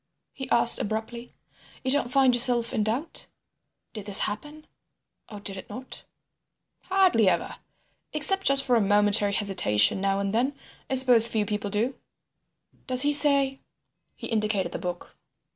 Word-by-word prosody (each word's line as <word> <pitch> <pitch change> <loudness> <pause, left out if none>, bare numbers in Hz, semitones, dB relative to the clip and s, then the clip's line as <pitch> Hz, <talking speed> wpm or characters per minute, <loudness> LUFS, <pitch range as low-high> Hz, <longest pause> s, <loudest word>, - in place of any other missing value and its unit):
he 265 -1 -10
asked 235 0 +6
abruptly. 225 +3 -7 0.5
"You 260 - -2
don't 270 -3 +1
find 265 -1 +2
yourself 240 -1 +2
in - - -2
doubt; 250 +10 -6 0.7
did 215 -2 -10
this 200 0 +5
happen 295 +9 -5 0.6
or 210 - -11
did 200 -1 -8
it - - -12
not?" 255 +1 -11 0.8
"Hardly 365 - +1
ever. - - -4 0.5
Except 385 +6 +1
just 275 0 +4
for 250 -3 0
a 230 - +1
momentary 205 0 +1
hesitation 190 - +1
now 195 0 -2
and 200 0 -4
then. 260 +5 -2 0.3
I 265 - -2
suppose 250 -3 +4
few 220 -3 -2
people 205 0 -5
do." 225 +6 -4 0.9
"Does 255 0 +2
he 290 +1 0
say—?" 280 -2 +3 0.5
He - - -11
indicated 210 -5 -3
the - - -7
book. 175 -1 -9
235 Hz, 150 wpm, -23 LUFS, 205-270 Hz, 0.9 s, asked